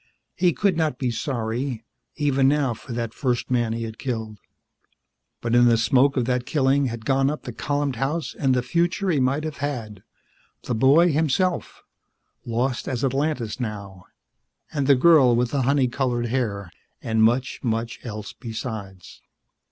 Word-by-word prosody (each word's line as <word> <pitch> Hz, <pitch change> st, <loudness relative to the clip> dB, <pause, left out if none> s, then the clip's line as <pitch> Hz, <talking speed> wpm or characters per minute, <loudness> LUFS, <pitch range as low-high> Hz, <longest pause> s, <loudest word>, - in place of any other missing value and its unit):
He 180 Hz, -1 st, +3 dB
could 195 Hz, +2 st, +1 dB
not 155 Hz, -6 st, 0 dB
be 125 Hz, -2 st, -1 dB
sorry, 120 Hz, 0 st, -3 dB, 0.3 s
even 140 Hz, -2 st, +2 dB
now, 140 Hz, -3 st, +2 dB
for 120 Hz, +3 st, -11 dB
that 115 Hz, -1 st, -3 dB
first 125 Hz, -3 st, -2 dB
man 120 Hz, -2 st, +1 dB
he 115 Hz, 0 st, -3 dB
had 110 Hz, -1 st, -7 dB
killed. 110 Hz, -4 st, -4 dB, 1.0 s
But 115 Hz, 0 st, -2 dB
in 120 Hz, 0 st, +6 dB
the 120 Hz, -1 st, +5 dB
smoke 135 Hz, +5 st, +3 dB
of 125 Hz, -, +1 dB
that 125 Hz, 0 st, -1 dB
killing 140 Hz, -1 st, +2 dB
had 115 Hz, -2 st, -6 dB
gone 135 Hz, 0 st, +2 dB
up 150 Hz, -, -4 dB
the 125 Hz, -, -7 dB
columned 145 Hz, -1 st, -2 dB
house 135 Hz, 0 st, -2 dB
and 135 Hz, -3 st, +1 dB
the 125 Hz, -, 0 dB
future 170 Hz, +7 st, 0 dB
he 150 Hz, -, +1 dB
might 135 Hz, +4 st, +1 dB
have 155 Hz, -2 st, -5 dB
had, 115 Hz, -9 st, -4 dB, 0.6 s
the -, -, -2 dB
boy 140 Hz, +9 st, +5 dB
himself 160 Hz, +4 st, 0 dB, 0.6 s
lost 120 Hz, +2 st, -1 dB
as 125 Hz, -1 st, -2 dB
Atlantis 135 Hz, -3 st, -1 dB
now 100 Hz, -5 st, -6 dB, 0.7 s
and 140 Hz, -3 st, -1 dB
the 140 Hz, -, +6 dB
girl 130 Hz, -3 st, +5 dB
with 120 Hz, 0 st, 0 dB
the 140 Hz, -, 0 dB
honey 135 Hz, 0 st, +2 dB
colored 120 Hz, -1 st, -1 dB
hair 110 Hz, -7 st, -2 dB, 0.3 s
and 110 Hz, -1 st, +1 dB
much, 120 Hz, +4 st, +2 dB
much 115 Hz, -1 st, -2 dB
else 105 Hz, -3 st, -7 dB
besides. 110 Hz, -5 st, -7 dB
125 Hz, 165 wpm, -23 LUFS, 115-140 Hz, 1.0 s, in